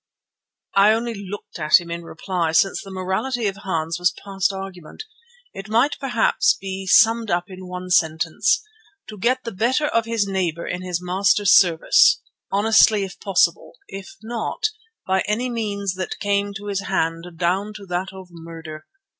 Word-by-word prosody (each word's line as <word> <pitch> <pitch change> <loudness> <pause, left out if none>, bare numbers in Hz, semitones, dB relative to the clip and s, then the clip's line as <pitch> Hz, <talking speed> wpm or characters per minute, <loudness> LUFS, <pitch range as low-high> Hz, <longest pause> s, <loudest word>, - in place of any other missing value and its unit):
I 200 +2 +6
only 230 +1 -2
looked 200 -2 -8
at 155 +3 +5
him 170 -1 -9
in 170 0 -4
reply, 170 0 -3
since 195 +4 +2
the 195 - -11
morality 190 +6 -2
of 200 -1 -1
Hans 165 -4 -3
was 180 0 +3 0.2
past 195 0 0
argument. 190 - -8 0.5
It 195 +2 -9
might 235 +7 +2
perhaps 245 -5 +2
be 190 0 -6
summed 225 +3 +5
up 175 +1 -1
in 185 0 -9
one 180 0 -7
sentence: 160 +3 +2 0.5
To 215 - -9
get 255 +5 +1
the 230 - -5
better 240 +9 +1
of 230 -5 +1
his 230 -3 0
neighbour 180 -4 -2
in 180 - -4
his 180 -1 -3
master's 195 +2 +3
service, 170 -4 +5 0.3
honestly 215 0 +4
if 190 0 -8
possible; 195 -2 +1 0.2
if 195 -1 -9
not, 240 - -2 0.4
by 190 0 +1
any 240 +4 -1
means 200 -4 -2
that 185 -1 -5
came 200 0 0
to 200 +1 -7
his 200 -1 -3
hand 165 -2 -1
down 185 +5 0
to 205 - -9
that 180 +1 -3
of 190 -1 -12
murder. 165 -2 -10
195 Hz, 165 wpm, -22 LUFS, 180-210 Hz, 0.5 s, I